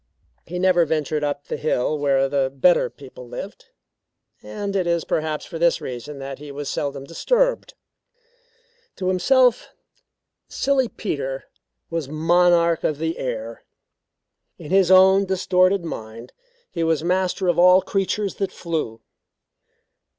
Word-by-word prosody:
He 180 - -5
never 180 -1 +3
ventured 155 -1 -1
up 145 -1 -3
the - - -4
hill 150 -1 0
where 135 -2 +1
the 135 -1 0
better 155 +7 +3
people 130 -3 -13
lived; 190 - -8 0.8
and 200 -1 -5
it 185 -3 0
is 170 -1 0
perhaps 155 -1 -2
for 165 - -7
this 170 0 +3
reason 125 +4 -7
that 135 0 -7
he 145 -1 -9
was 140 0 -5
seldom 140 -1 -3
disturbed. - - 0 1.2
To 185 -1 -2
himself 245 +7 +3 0.8
Silly 270 -2 +1
Peter 135 -11 -4 0.5
was 165 -5 -3
monarch 170 +1 +3
of 150 - 0
the 160 +2 -3
air. 115 -2 -5 0.9
In 150 - -10
his 190 -2 +4
own 190 +1 +6
distorted 185 0 +2
mind 115 -5 -8 0.4
he 170 - -2
was 160 -1 +1
master 185 +1 0
of 175 -1 +2
all 180 +1 +6
creatures 195 +1 -1
that 195 -2 -2
flew. 155 -10 -4
165 Hz, 135 wpm, -22 LUFS, 140-185 Hz, 1.2 s, own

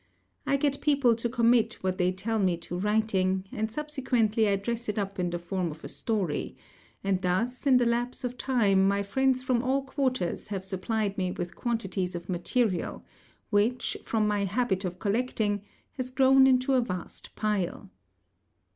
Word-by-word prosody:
I 275 - +3
get 280 0 0
people 280 -5 +4
to 235 +1 -2
commit 235 -1 +3
what 185 0 -1
they 180 0 +3
tell 215 +4 -2
me 185 -4 +2
to 170 +1 -7
writing, 190 -2 +1
and 220 -3 -2
subsequently 245 -7 +1
I 200 - +3
dress 235 +3 -3
it 210 - -2
up 200 -2 -3
in 175 -1 0
the 175 - -2
form 175 0 -2
of 155 0 -10
a - - -5
story; 195 -10 -2 0.5
and 195 -1 0
thus 225 +9 -1
in 260 -2 +6
the 245 - +3
lapse 240 +2 -1
of 250 0 -3
time 205 -8 +3
my 200 0 +1
friends 260 +5 +1
from 255 -2 +1
all 265 +2 +1
quarters 260 - -1
have 195 -3 -4
supplied 200 +2 -2
me 185 -1 0
with 175 -1 -5
quantities 195 -6 -2
of 170 +1 -7
material, 185 +2 -1 0.5
which, 220 +4 +1
from 215 -2 0
my 205 -1 +1
habit 195 -1 0
of 180 0 -4
collecting, 210 -1 0 0.3
has 255 -1 -5
grown 265 0 +5
into 255 +1 +3
a 255 - +4
vast 185 -7 -6
pile. 200 -2 -2
215 Hz, 175 wpm, -28 LUFS, 190-250 Hz, 0.5 s, in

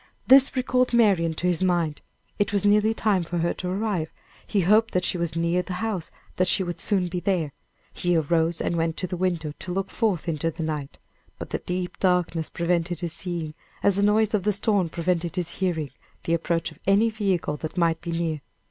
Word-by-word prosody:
This 270 0 +6
recalled 255 -1 +1
Marian 190 -8 +3
to 175 - -4
his 180 -2 +1
mind; 175 -5 +1 0.4
it 205 -1 +1
was 205 0 +1
nearly 210 +1 +4
time 210 -5 +1
for 175 +1 -4
her 170 +1 +1
to 180 - -5
arrive; 190 -4 -1 0.4
he 200 - +1
hoped 215 +5 +3
that 180 0 +2
she - - 0
was 170 -1 -2
near 170 +2 +1
the 180 +1 -6
house; 190 -3 -3 0.3
that 185 - +2
she 190 - +3
would 175 -1 -5
soon 190 -4 +1
be 175 +1 -3
there; 175 -6 -1 0.4
he 175 0 0
arose 165 +1 +1
and 170 - -1
went 165 -1 -1
to 185 - -2
the 180 - -4
window 170 -4 -1
to 180 - -6
look 195 +1 -2
forth 205 -7 0
into 165 0 0
the 165 0 -5
night; 150 -3 -4 0.4
but - - -8
the - - -1
deep 180 0 -4
darkness 180 -3 +1
prevented 170 0 -1
his 170 -2 -2
seeing, 170 -4 -3 0.3
as 200 - +4
the 200 - +1
noise 210 +1 +3
of 210 - +2
the 210 +2 +1
storm 200 -3 +1
prevented 170 0 -1
his 175 -2 -3
hearing 165 -7 -1 0.3
the 165 - 0
approach 165 0 0
of - - -17
any 210 +4 +4
vehicle 195 -8 -1
that 155 +3 -6
might 165 -2 +2
be 170 - -5
near. 165 -3 -2
180 Hz, 210 wpm, -25 LUFS, 165-200 Hz, 0.4 s, This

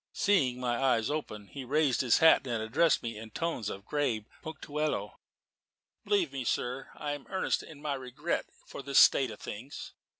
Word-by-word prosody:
Seeing 135 -12 +2
my 120 0 -1
eyes 125 -2 +2
open, 110 -9 -4
he 135 +6 -8
raised 140 0 +2
his 125 -3 +4
hat 160 -4 +6
and 120 -2 -1
addressed 150 +8 +2
me 115 -2 -4
in 110 0 -9
tones 125 -4 -2
of 100 +1 -7
grave 125 -7 -1 0.2
punctilio. 155 -1 -3 0.9
"Believe 400 -5 +1
me, 135 - -3
sir, 125 +2 -2
I 145 - -4
am 145 -1 -6
earnest 190 - 0
in 150 -2 -12
my 150 -2 -1
regret 135 +5 -3 0.2
for - - -8
this 140 0 -1
state 135 -2 +7
of 105 - -9
things. 125 +7 -7
135 Hz, 175 wpm, -30 LUFS, 120-150 Hz, 0.9 s, state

